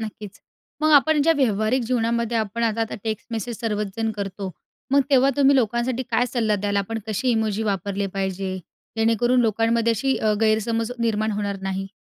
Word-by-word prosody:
नक्कीच. 210 -2 -8 0.4
मग 310 - +4
आपण 300 +1 +5
ज्या 330 - +4
व्यावहारिक 225 -1 +1
जीवनामध्ये 235 -1 0
आपण 220 +1 -2
आता 225 0 0
आता 225 - -2
टेक्स्ट 220 -1 -3
मेसेज 230 0 -4
सर्वच 210 -2 -1
जण 225 -1 0
करतो. 195 -1 -4 0.4
मग 280 +1 +5
तेव्हा 270 0 +5
तुम्ही 280 0 +5
लोकांसाठी 240 +1 0
काय 245 +2 +2
सल्ला 220 -4 +1
द्याल? 200 0 -2
आपण 210 +3 -1
कशी 220 +4 -1
इमोजी 220 -2 0
वापरले 200 -1 -2
पाहिजे? 190 -1 -2 0.4
जेणेकरून 230 +3 +2
लोकांमध्ये 230 +1 +2
अशी 265 +4 0
अ, 215 -1 +1
गैरसमज 225 +1 +1
निर्माण 220 -1 0
होणार 205 -1 -2
नाही. 195 0 -3
225 Hz, 170 wpm, -23 LUFS, 205-235 Hz, 0.4 s, आपण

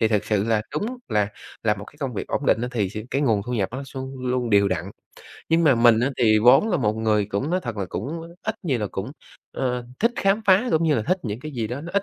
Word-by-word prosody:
Thì 110 - +3
thật 105 -2 +1
sự 105 -2 +1
là 110 -1 +1
đúng 240 +5 -3
là 105 -1 +1 0.3
là 105 -2 +2
một 100 0 -9
cái - - -16
công 135 -4 -3
việc - - -4
ổn 140 - -2
định 115 - +3
á 125 - -1
thì 100 -6 0
sẽ 105 - -5
cái 140 - 0
nguồn 110 -7 +2
thu 125 - -3
nhập 100 -4 0
nó 130 - -4
luôn 130 0 -5
luôn 125 -1 0
đều 100 -1 +5
đặn. 90 +2 -3 0.6
Nhưng 165 +1 +4
mà 140 -5 +6
mình 115 -1 +5
á 130 +3 +1
thì 110 -3 +5
vốn 125 - +6
là 180 - +2
một 105 -4 +1
người 110 -2 +2
cũng, 105 +9 -2
nói 185 +1 +1
thật 120 -3 -5
là, 95 - -2
cũng 165 +3 -5
ít 220 0 -2
nhiều 135 -8 +1
là 105 - -1
cũng, 105 +9 -4 0.4
ờ, 125 -2 -2
thích 230 +3 +3
khám 195 +3 +2
phá 190 +4 +5
cũng 160 - +3
như 155 - +3
là 110 - 0
thích 185 - 0
những 110 +2 -4
cái 155 +1 -7
gì 115 -4 -2
đó 125 +5 -5
nó 170 +2 -7
ít 200 - +2
120 Hz, 285 wpm, -23 LUFS, 105-155 Hz, 0.6 s, mà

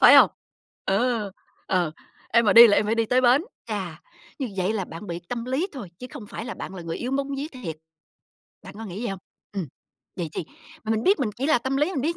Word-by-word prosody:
phải - - +10
hông? - - +9 0.5
Ờ, 220 +1 +1 0.4
ờ, 175 -4 +1 0.4
"Em 235 +1 +4
mà 210 - +5
đi 235 +1 +12
là 205 - +4
em 210 - +3
phải 220 - +2
đi 230 0 +2
tới 250 +3 +3
bến". 255 +5 +5 0.2
Chà, - - -4 0.4
như 265 -4 -2
vậy 185 +2 +1
là 205 -4 -1
bạn 170 +4 -9
bị 170 -2 -3
tâm 235 -1 -3
lý 260 +8 0
thôi, 255 - -7
chứ 250 - -7
không 270 -8 -8
phải 215 - -6
là 240 - -5
bạn 190 - -7
là 180 - -7
người 165 0 -4
yếu 245 - -3
bóng 275 +1 0
vía 280 +2 -2
thiệt. 185 - -6 0.9
Bạn 190 - -10
có 225 - -6
nghĩ 195 +1 -6
vậy 240 - -2
hông? 195 -1 -5 0.3
Ừm. 195 -5 -2 0.5
Vậy 175 -4 -2
thì, - - -3 0.4
mà 220 - -2
mình 220 0 +1
biết 390 -2 +4
mình 240 -5 +1
chỉ 265 +3 -1
là 310 -4 +5
tâm 265 +3 -1
lý, 295 +7 +2
mình 280 - -1
biết 335 +4 0
230 Hz, 250 wpm, -25 LUFS, 195-260 Hz, 0.9 s, đi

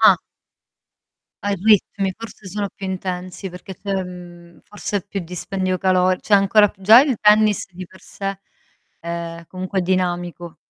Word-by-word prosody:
Ah. 210 -4 +7 1.3
Ah, 205 - 0
i - - +2
ritmi 200 -1 +2
forse 225 -3 -10
sono 205 +1 -3
più 195 - -10
intensi 185 0 -4
perché 180 +2 -10
c'è, 195 +2 -4
mhmm, 175 -1 -12
forse 205 0 -4
più 195 - -3
dispendio 185 +2 -3
calor 185 -1 +2
cioè 210 - +2
ancora 205 +1 +5
p 195 - -19
già 220 +5 +9
il 270 -3 +1
tennis 210 0 +4
di 185 +1 -8
per 190 +2 -18
sé, 195 -1 -5 0.6
ehm, 170 0 -5
comunque 185 +2 -4
è - - +2
dinamico. 175 -2 -2
190 Hz, 155 wpm, -21 LUFS, 180-205 Hz, 1.3 s, già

